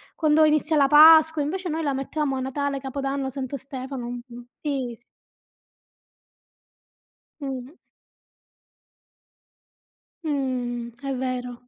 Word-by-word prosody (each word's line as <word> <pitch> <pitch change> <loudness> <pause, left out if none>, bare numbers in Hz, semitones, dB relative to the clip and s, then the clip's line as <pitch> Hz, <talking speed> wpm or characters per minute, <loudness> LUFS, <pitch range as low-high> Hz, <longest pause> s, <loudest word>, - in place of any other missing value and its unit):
quando 310 -1 +3
inizia 305 +1 +2
la 280 -2 +5
Pasqua", 315 +1 +7
invece 365 +5 -3
noi 320 +1 -2
la 285 -2 0
mettevamo 275 +1 -2
a - - -2
Natale, 275 +2 -2
Capodanno, 270 0 -3
Santo 265 +1 -5
Stefano, 265 -1 -6
mh-mh, 245 0 -9
sì, 270 -5 -3
s 240 - -19 2.4
Mh. 270 +1 -6 2.5
Mh, 250 -5 -3
è 275 -1 -3
vero. 250 -1 -4
275 Hz, 105 wpm, -24 LUFS, 255-300 Hz, 2.5 s, Pasqua